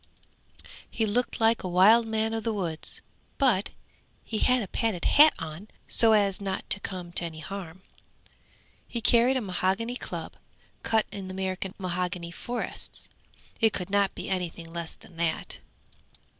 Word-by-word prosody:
He 225 - 0
looked 240 +4 0
like 225 0 +4
a - - -4
wild 210 +6 +6
man 220 0 0
of 225 -1 -2
the 225 - 0
woods, 170 -6 -3 0.4
but 240 -9 +3 0.5
he 220 - -3
had 250 -2 +4
a - - -5
padded 210 -2 0
hat 300 +1 +7
on 160 +5 -7 0.2
so 225 -1 +5
as 200 -2 +2
not 195 -1 -3
to - - +4
come 180 -3 -6
to 175 - 0
any 165 -2 -5
harm. 185 +1 -7 1.0
He 235 - -3
carried 240 +3 +4
a - - -1
mahogany 195 +5 -1
club - - -7 0.4
cut 220 -1 +2
in 195 -2 -6
the 185 - -6
American 190 0 -3
mahogany 180 -2 -3
forests. 240 +7 -4 0.5
It 225 -2 +4
could 180 0 -4
not 200 -1 +2
be - - -6
anything 175 -3 -3
less 170 -1 -3
than 170 - -18
that. 165 -1 -2
195 Hz, 155 wpm, -27 LUFS, 180-225 Hz, 1.0 s, hat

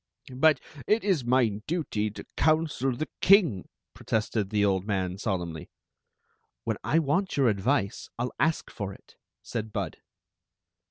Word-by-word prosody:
But 150 +1 +5 0.3
it 215 +2 +3
is 190 -9 +2
my 120 -4 +2
duty 145 -11 -1
to 105 - -9
counsel 155 -4 +2
the 145 +6 -3
king," 175 - +5 0.2
protested 110 -2 -1
the 105 -1 +2
old 95 -2 +1
man, 95 -2 -1
solemnly. 85 -7 -3 0.9
"When - - -1
I 160 - +2
want 165 +5 +1
your 135 -3 +4
advice 105 +1 0
I 120 - -1
'11 125 - -2
ask 160 +2 +1
for 100 -2 -5
it," - - -20 0.3
said 110 -2 -4
Bud. - - -3
120 Hz, 145 wpm, -28 LUFS, 100-155 Hz, 0.9 s, But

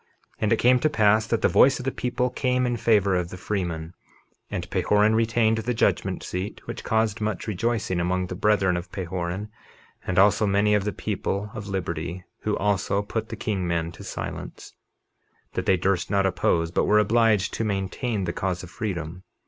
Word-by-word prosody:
And 105 - 0
it 115 - +4
came 125 +2 +4
to 155 - +2
pass 110 -5 +3
that 115 - 0
the - - +6
voice 135 +1 +5
of 125 - -7
the 135 - 0
people 125 0 -1
came 125 -1 +1
in 120 -1 0
favor 110 -4 +3
of 90 -1 -1
the 90 - -8
freemen, 85 -4 -3 0.6
and - - -4
Pahoran 105 +1 +3
retained 115 0 +2
the 120 +2 -2
judgment - - 0
seat, 95 +3 -4
which - - -6
caused 110 0 0
much 105 -2 -2
rejoicing 110 -3 -1
among 90 +1 0
the 90 - -6
brethren 95 -2 +2
of 85 +1 -7
Pahoran 95 +1 -4 0.6
and 90 - -1
also 105 +2 +5
many 100 +1 +3
of 105 -1 +2
the 105 - 0
people 105 0 -3
of 100 -2 -7
liberty, 90 -2 -4 0.2
who - - -1
also 100 0 0
put 110 +2 -4
the 115 - -5
king 100 -4 -2
men 85 -1 -1
to - - -12
silence, - - -7 0.8
that - - -3
they 95 - +4
durst 95 0 0
not 100 -1 +2
oppose 85 -3 +1
but - - +1
were 105 - +4
obliged 110 -2 +3
to - - -2
maintain 100 +2 -2
the 85 -1 -2
cause 95 -1 -2
of 90 - -10
freedom. 90 -5 -4
100 Hz, 190 wpm, -25 LUFS, 90-110 Hz, 0.8 s, the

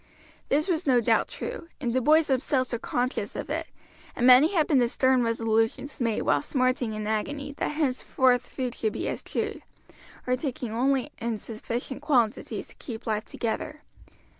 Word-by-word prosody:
This 300 +5 +2
was 340 -3 0
no 250 -2 +5
doubt 235 - +2
true, 330 - -6
and 245 -5 -1
the 260 - +2
boys 310 +5 +5
themselves 260 -1 0
were 235 - -1
conscious 250 +2 -2
of - - -5
it, - - -2 0.5
and 245 - 0
many 255 +6 +8
had 315 -3 +4
been 290 -4 +3
the 240 -1 +3
stern 260 0 +3
resolutions 225 +3 0
made 230 -3 0
while 145 - +2
smarting 255 - 0
in 215 0 -4
agony 280 +7 -2
that - - -1
henceforward 260 -4 +2
food 250 0 -4
should 220 -3 -2
be - - -3
eschewed, - - -3 0.6
or 250 - +2
taken 255 -4 -4
only 260 +3 +1
in 230 -1 -2
sufficient 235 +5 -5
quantities 250 -7 0
to - - -14
keep 225 -4 -7
life 215 -1 -1
together. 240 +6 -4
250 Hz, 170 wpm, -27 LUFS, 230-275 Hz, 0.6 s, many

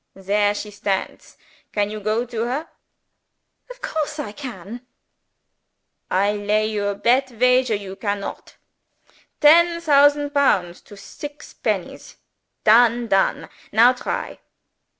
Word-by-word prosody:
"There 205 +2 0
she 210 0 -6
stands. 200 -1 -4 0.3
Can 205 0 -1
you 215 - -5
go 215 +3 -1
to 235 -2 -5
her?" 275 +7 -3 1.0
"Of - - -12
course 310 -1 -3
I 290 -9 -5
can!" 235 -2 -9 1.3
"I 200 +2 +2
lay 210 +1 0
you 210 -2 -2
a 200 - -1
bet 250 +6 +2
wager 250 0 +2
you 195 -2 -7
can 200 +1 -2
not! - - -8 0.9
Ten 335 +3 +5
thausand 290 -2 +3
pounds 190 -12 +1
to 205 - -14
six 290 +9 -10
pennies. - - -4 0.5
Done 235 +1 +4
done. 195 0 +1 0.2
Now 235 +4 +6
try!" 250 - -5
225 Hz, 125 wpm, -21 LUFS, 205-280 Hz, 1.3 s, Now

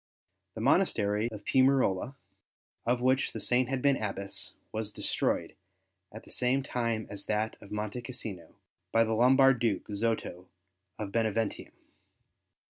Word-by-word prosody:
The - - -5
monastery 105 +3 +2
of 105 -2 -9
Piumarola, 130 -3 +3 0.7
of 120 0 +2
which 130 +1 +2
the - - -4
Saint 125 0 +1
had 135 -1 -2
been 140 -2 +4
Abbess, 100 -2 -2 0.2
was 110 -1 -3
destroyed - - -1 0.6
at 110 - -10
the - - -12
same 130 +2 +1
time 115 -5 -1
as 100 -1 -9
that 110 +1 0
of 100 - -13
Monte 105 +3 -3
Cassino, 110 -8 -7 0.4
by 115 - +5
the 115 0 -1
Lombard 130 +2 +5
duke, 115 -4 0
Zoto 105 -4 -2 0.5
of 105 -2 -5
Beneventum. 110 -1 -1
115 Hz, 135 wpm, -30 LUFS, 105-125 Hz, 0.7 s, by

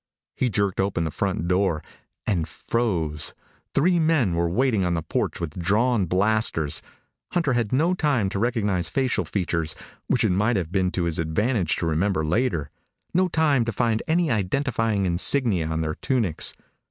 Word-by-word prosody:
He 130 - +1
jerked 100 -3 0
open 95 -3 0
the 80 - -2
front 95 -1 -2
door 90 -3 +1 0.4
and 85 -7 0
froze. 85 -11 -1 0.4
Three 175 +5 +3
men 155 - +2
were 85 0 +1
waiting 115 +1 +1
on 90 -1 0
the 80 - -2
porch - - -2
with 85 0 -5
drawn 105 +3 +2
blasters. 95 -5 +1 0.5
Hunter 165 -7 +1
had 120 -4 0
no 160 +7 +2
time 145 - +1
to 100 - -3
recognize 105 -6 0
facial 130 -2 0
features 85 -5 -1 0.3
which - - +2
it - - +2
might 105 +6 +2
have 85 -3 -3
been 95 -1 +1
to 90 - 0
his 85 -2 -1
advantage 90 +3 0
to - - -2
remember 80 +1 0
later, 85 - 0 0.4
no 185 +1 +3
time 155 -7 +2
to 115 - -1
find 115 0 0
any 165 -1 +2
identifying 110 -1 0
insignia 95 - +2
on 80 0 -2
their 80 -1 -1
tunics. 110 - 0
100 Hz, 165 wpm, -24 LUFS, 85-125 Hz, 0.5 s, Three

